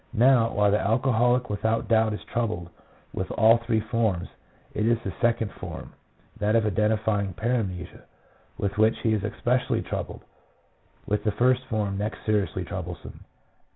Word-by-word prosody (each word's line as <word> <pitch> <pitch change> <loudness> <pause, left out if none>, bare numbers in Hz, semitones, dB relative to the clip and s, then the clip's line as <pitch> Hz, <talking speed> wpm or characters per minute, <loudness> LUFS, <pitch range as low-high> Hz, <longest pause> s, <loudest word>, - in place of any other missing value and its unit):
Now, 120 -1 +5
while 105 0 +3
the 105 - +3
alcoholic 120 +3 +2
without 110 +2 0
doubt 110 -1 +3
is 105 - -6
troubled 110 -8 -3 0.4
with 95 - -3
all 115 +1 +6
three 115 -1 0
forms, 110 -5 -1 0.4
it 105 +1 0
is 120 0 +3
the 95 - -4
second 115 -3 +1
form, - - -8 0.5
that 105 +1 +2
of 115 -1 +3
identifying 105 -2 0
paramnesia, 105 -7 -2 0.6
with 100 +1 -2
which 110 +1 +4
he 110 - +2
is 105 -3 -1
especially 125 +4 0
troubled; - - -5 0.8
with 105 +1 -1
the 105 - +1
first 125 +3 +2
form 105 -5 -2
next 105 +2 -4
seriously 105 -3 0
trouble 90 -1 -5
some. - - -10
110 Hz, 155 wpm, -26 LUFS, 100-115 Hz, 0.8 s, all